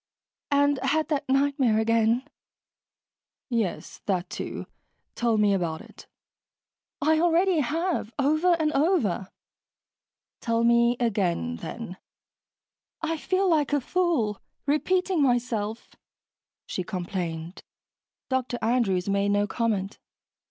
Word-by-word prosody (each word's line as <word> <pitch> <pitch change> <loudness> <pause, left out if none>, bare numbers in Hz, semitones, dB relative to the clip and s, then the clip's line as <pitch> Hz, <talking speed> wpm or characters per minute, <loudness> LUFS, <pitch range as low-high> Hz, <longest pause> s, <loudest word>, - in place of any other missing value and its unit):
"And 285 -1 +3
had 290 +5 0
that 285 -3 -1
nightmare 270 -4 +2
again." 230 +3 +2 1.2
"Yes, 225 -7 -2
that, 185 -2 -1
too. - - -5 0.5
Tell 235 -2 +1
me 210 -1 +4
about 170 -4 -1
it." - - -15 1.0
"I 315 +1 +4
already 345 +1 +3
have. 320 - -1
Over 310 +5 +3
and 315 -2 0
over." 275 - +1 1.1
"Tell 230 -1 0
me 235 +1 +4
again, 180 - 0
then." 190 - -7 1.1
"I 325 0 0
feel 375 +5 0
like 305 -4 +2
a 290 - +4
fool, 275 - 0 0.2
repeating 360 +4 +1
myself," 235 -4 0 0.7
she 185 - -3
complained. 175 -2 -4 0.7
Dr. 255 -2 -1
Andrew's 215 -6 +1
made 200 0 +1
no 205 0 +2
comment. 205 -2 -2
240 Hz, 105 wpm, -26 LUFS, 205-300 Hz, 1.2 s, me